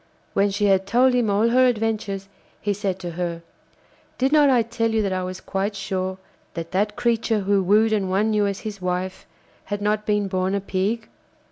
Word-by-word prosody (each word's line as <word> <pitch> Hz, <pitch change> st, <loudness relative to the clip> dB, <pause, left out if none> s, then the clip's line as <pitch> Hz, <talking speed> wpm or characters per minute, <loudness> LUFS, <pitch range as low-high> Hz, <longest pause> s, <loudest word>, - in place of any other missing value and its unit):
When 200 Hz, +1 st, +3 dB
she 205 Hz, +1 st, 0 dB
had 195 Hz, -1 st, +3 dB
told 250 Hz, +4 st, +4 dB
him 245 Hz, -3 st, +2 dB
all 210 Hz, +3 st, +3 dB
her 255 Hz, +2 st, +5 dB
adventures, 215 Hz, -4 st, -1 dB, 0.3 s
he 205 Hz, -, -1 dB
said 195 Hz, -2 st, -2 dB
to 175 Hz, -2 st, -4 dB
her: 170 Hz, -1 st, -4 dB, 0.7 s
'Did 265 Hz, +2 st, +1 dB
not 300 Hz, -2 st, +5 dB
I 245 Hz, -3 st, +4 dB
tell 230 Hz, 0 st, -1 dB
you 220 Hz, -1 st, +1 dB
that 195 Hz, -2 st, -1 dB
I 185 Hz, -, -1 dB
was 185 Hz, 0 st, -5 dB
quite 195 Hz, +2 st, -2 dB
sure 190 Hz, -1 st, -3 dB, 0.4 s
that 165 Hz, 0 st, -5 dB
that 210 Hz, +3 st, 0 dB
creature 230 Hz, -2 st, +1 dB
who 200 Hz, 0 st, +2 dB
wooed 215 Hz, +4 st, +3 dB
and 195 Hz, -3 st, 0 dB
won 210 Hz, +4 st, +1 dB
you 210 Hz, -1 st, +2 dB
as 200 Hz, -1 st, -3 dB
his 210 Hz, -3 st, -6 dB
wife 180 Hz, +1 st, -3 dB, 0.4 s
had 205 Hz, -1 st, -3 dB
not 210 Hz, +1 st, -1 dB
been 210 Hz, -1 st, +1 dB
born 185 Hz, 0 st, 0 dB
a -, -, +1 dB
Pig? 200 Hz, +4 st, -2 dB
205 Hz, 205 wpm, -23 LUFS, 190-220 Hz, 0.7 s, her